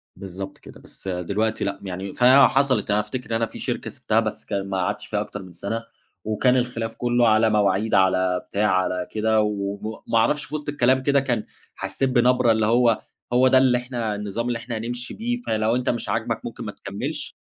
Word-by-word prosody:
بالضبط 95 0 -8
كده، - - -14
بس - - -13
دلوقتي 100 +5 -1
لأ، 100 -1 -2
يعني 95 +1 -5
فحصلت 130 -2 +4
أنا 105 - +3
أفتكر 115 +4 -5
إن 115 - 0
أنا 115 0 +1
في - - -11
شركة - - -3
سِبتها، - - 0
بس - - -3
كان 100 -1 -3
ما 95 - -1
قعدتش 90 - -2
فيها - - -1
أكتر 105 - -6
من 90 - -12
سنة، 115 +6 -4 0.4
وكان 110 +4 +2
الخلاف 120 -3 -2
كُلّه 120 -1 +2
على 110 +1 +4
مواعيد، 105 0 +1
على 95 -1 +2
بتاع، 105 +1 +1
على 90 -1 0
كده، 110 0 +2
وم 100 -1 -2 0.3
ما 115 - +2
أعرفش 145 +7 +2
في 155 - -6
وسط 150 -1 -4
الكلام 130 -2 +2
كده 140 0 +3
كان 120 -5 -1 0.3
حسّيت 95 +8 -1
بنبرة 125 -1 +4
اللي 110 -1 +2
هو 115 0 +3 0.3
هو 125 +1 +5
ده 130 - +5
اللي 130 -1 +4
إحنا 120 -4 -3
النظام 105 +3 -3
اللي 120 -1 -1
إحنا 120 -1 -5
هنمشي 120 +2 -5
بيه، 240 +2 -2
فلو 110 - 0
أنت 125 0 0
مش 120 - -2
عاجبَك - - -2
ممكن - - -6
ما - - -4
تكمِّلش، - - -5
115 Hz, 200 wpm, -23 LUFS, 100-125 Hz, 0.4 s, هو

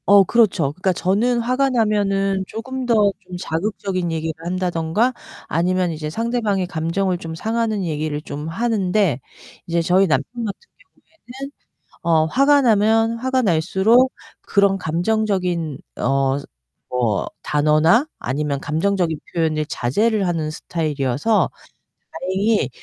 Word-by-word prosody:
어 200 0 +8
그렇죠. 190 -9 +2
그러니까 185 +3 0
저는 215 +8 +1
화가 255 +3 +1
나면은 200 -5 +1
쪼금 260 +3 -5
더 215 -4 +4
좀 180 -2 -9
자극적인 185 0 -2
얘기를 160 0 -2
한다든가 180 +5 0 0.3
아니면 180 +2 +1
이제 155 -1 -4
상대방의 220 0 -1
감정을 175 +3 -1
좀 165 -1 -6
상하는 220 +1 -1
얘기를 155 -2 -2
좀 150 0 -6
하는데 195 - +1 0.5
이제 170 0 +1
저희 185 +3 +3
남편 235 +8 -1
같은 200 - -5 0.7
경우에는 270 +3 -7 0.5
어 165 -2 +3
화가 275 - +4
나면 225 0 +3
화가 260 +1 0
날수록 205 +7 +3 0.3
그런 200 -1 +2
감정적인 180 -3 -1 0.2
어 135 +1 +1 0.5
뭐 120 -5 0 0.2
단어나 155 - +3
아니면 140 +2 -2
감정적인 165 0 0
표현을 155 -2 0
자제를 205 - 0
하는 165 -3 -1
스타일이어서 155 - 0 0.6
다행히 190 +6 0
185 Hz, 290 characters per minute, -21 LUFS, 160-220 Hz, 0.7 s, 어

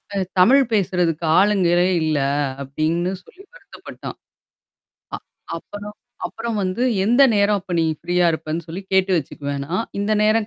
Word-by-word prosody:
அ - - -1 0.2
தமிழ் 265 +9 +6
பேசுறதுக்கு 180 -5 0 0.2
ஆளுங்களே 180 -3 +3 0.2
இல்லை 150 -3 +1 0.4
அப்படின்னு 160 +6 -1
சொல்லி 375 - -18
வருத்தப்பட்டான். - - -10 1.0
அ - - -1 0.4
அப்புறம். 205 +4 -9 0.3
அப்புறம் 230 -1 -5
வந்து 185 +5 -2 0.2
எந்த 240 +6 +4
நேரம் 205 0 +3
அப்போ 180 -1 -9
நீ 165 - +2 0.2
ஃப்ரீயா 175 0 +1
இருப்பேன்னு 160 +1 -4
சொல்லி 175 +4 -7
கேட்டு 190 0 +3
வச்சுக்குவேன் 140 -1 -4
நான். 185 +8 -1
இந்த 205 +2 0
நேரம் 215 0 +2
185 Hz, 140 wpm, -21 LUFS, 165-210 Hz, 1.0 s, தமிழ்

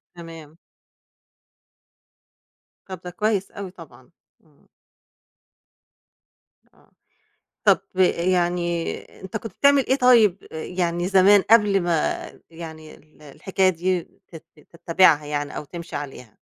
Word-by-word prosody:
تمام. 165 -2 -12 2.3
طب 185 -3 -8
ده 180 - -6
كويس 210 0 -1
أوي 195 -2 -8
طبعًا، 160 -8 -16 0.3
امم. 150 -3 -29 2.1
آه، - - -28 0.7
طَب - - +4 0.2
آآ 190 - +4 0.2
يعني 175 -2 0 0.3
أنت 190 +3 -7
كنت 220 -2 -6
بتعمل 280 -1 +3
إيه 265 - +2
طيب، 230 -7 +4
ي - - -7 0.2
يعني 175 0 -1
زمان 195 +1 +5
قبل 210 -4 +5
ما 170 -3 -1 0.3
يعني 160 -2 -10
ال 155 0 -23
الحكاية 185 +6 -1
دي 180 0 -1 0.3
تت 165 -2 -12 0.3
تتبّعها 165 -2 +3
يعني 145 -1 -4
أو - - -5
تمشِي 170 +4 -8
عليها؟ 135 -6 -9
175 Hz, 115 wpm, -22 LUFS, 160-195 Hz, 2.3 s, زمان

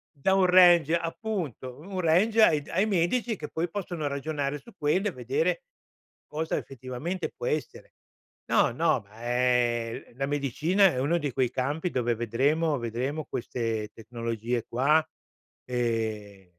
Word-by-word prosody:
Dà 165 +7 +1
un 190 -1 +4
range 175 -3 +6
appunto, 165 - -4
un 185 +3 -6
range 200 +8 +3
ai 155 -7 +5
d 145 - -17
ai 190 +4 +2
medici 215 +5 +1
che 150 - -6
poi 165 +1 -2
possono 175 -5 -4
ragionare 140 0 -2
su 235 - -16
quello 180 +8 +1
e - - -1
vedere 460 - -1 0.7
cosa 160 +2 -2
effettivamente 135 +8 -5
può - - -6
essere. 155 -1 -4 0.5
No, - - +3
no, - - +1
ma 105 +3 -16
è 120 -1 0
la 135 +2 -1
medicina 145 - +2
è 125 - -3
uno 150 +6 +2
di 145 -3 -2
quei 130 -1 +1
campi 145 +8 -1
dove 120 -2 0
vedremo 140 +8 +1
vedremo 125 +6 -3
queste 115 -3 -3
tecnologie 115 +1 -4
qua, 150 +6 +3 0.6
ehm 110 -6 -3
145 Hz, 145 wpm, -27 LUFS, 120-170 Hz, 0.7 s, range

